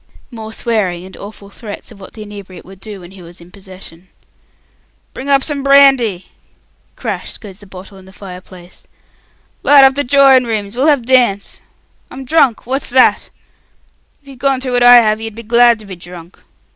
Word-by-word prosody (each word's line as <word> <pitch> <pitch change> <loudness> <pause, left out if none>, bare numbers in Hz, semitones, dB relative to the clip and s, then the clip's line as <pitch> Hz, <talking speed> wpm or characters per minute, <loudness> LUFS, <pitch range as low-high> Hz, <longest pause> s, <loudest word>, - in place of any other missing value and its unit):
More 220 -2 -9
swearing, 200 -7 -2
and 190 - -13
awful 200 -1 -12
threats 210 0 -10
of 200 -3 -15
what 190 - -13
the 215 - -9
inebriate 200 -3 -12
would 190 0 -15
do 205 -1 -10
when 175 +1 -13
he 190 -1 -14
was 175 +1 -14
in 170 +1 -17
possession. 185 -2 -14 1.0
"Bring 270 +2 -8
up 275 -1 +3
some 290 -2 -4
brandy!" 270 -9 +3 0.7
Crash - - -6
goes 200 -3 -13
the 205 - -16
bottle 190 +1 -13
in 185 - -17
the 190 - -16
fire 185 -2 -11
place. 180 -1 -15 0.7
"Light 285 -1 +6
up 270 0 +5
the 285 +1 -2
droring 270 -1 +4
rooms; 215 -2 -4
we'll 265 +5 0
have 285 -6 +2
dance! 240 -6 0 0.5
I'm 265 0 -10
drunk! 275 -5 +1
What's 265 +3 -4
that? 255 0 +2 0.9
If - - -28
you'd 270 -2 -13
gone 270 -1 0
through 255 -1 -4
what 245 - +1
I 245 0 +8
have, 220 -2 +3
you'd 225 -1 -7
be 230 - -10
glad 235 +1 +4
to 215 - -13
be 195 -2 -9
drunk. 175 0 -13
220 Hz, 190 wpm, -14 LUFS, 190-260 Hz, 1.0 s, I